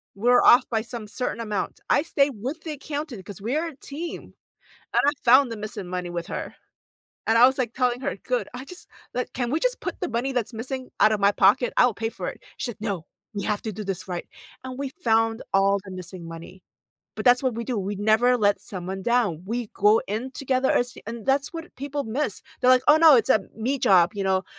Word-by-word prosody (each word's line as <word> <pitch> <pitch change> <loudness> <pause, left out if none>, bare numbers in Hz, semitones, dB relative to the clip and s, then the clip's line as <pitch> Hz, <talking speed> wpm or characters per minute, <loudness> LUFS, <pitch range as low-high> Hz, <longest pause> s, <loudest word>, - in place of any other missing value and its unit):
We're 245 +4 +4
off 250 +1 +7
by 225 -2 0
some 230 -1 -7
certain 235 +3 -3
amount. 210 -3 -3
I - - +5
stayed 290 -3 +1
with 285 +8 -4
the 320 - -5
accountant 290 -6 -5
'cause 200 -1 -9
we 235 +7 -2
are 325 +2 0
a 320 - -9
team. 300 +5 -7 0.6
And - - +4
I 290 - +4
found 255 +1 +6
the 230 - -4
missing 210 -3 -6
money 180 0 -4
with 170 -1 -4
her. - - -5 0.7
And 225 - +4
I 240 - +9
was, 265 - 0
like, 245 -3 -1
telling 250 -1 0
her, - - -2
"Good, 250 +4 -2
I 255 +2 -7
just 360 +4 -12 0.3
like, 250 - -3
can 245 -1 -2
we 310 - +1
just - - 0
put - - -5
the 360 - -2
money 245 +4 -1
that's 245 -2 -2
missing 255 +3 -5
out 215 +1 +6
of 215 - 0
my 200 0 +4
pocket? 205 +6 +3
I - - +7
will 245 - +1
pay 225 +2 -3
for - - -6
it." - - -11 0.2
She 250 - -3
like, 210 - -16
"No, 200 -7 -3 0.3
we 200 - -4
have 210 -1 -1
to 220 - -3
do 210 +1 -6
this 195 -2 -4
right." 175 -2 -5 0.4
And 255 -1 -7
we 280 -1 -2
found 225 -3 +1
all 195 +1 +3
the 190 - -9
missing 185 -1 -8
money. 170 +3 -10 0.5
But - - -5
that's 250 0 +5
what 260 -3 0
we 230 +1 -4
do, 245 -2 -2
we 200 +1 -3
never 220 +5 +3
let 205 -3 +2
someone 190 0 -6
down, 225 -8 +1
we 235 +1 -3
go 210 +2 +4
in 225 +6 -3
together 265 -1 0
as 245 +1 +1
and 230 -1 -6
that's 275 +1 +1
what 330 0 -8
people 285 +1 -4
miss, 225 -1 -2 0.2
they're 255 - +5
like, 255 0 +6
"Oh, 300 +1 +8
no, 315 -4 +8
it's 230 - +1
a 215 - +5 0.2
'me' 250 +5 -1
job," 185 -5 +4
you 200 - -2
know? 190 0 +1
235 Hz, 235 wpm, -25 LUFS, 205-260 Hz, 0.7 s, I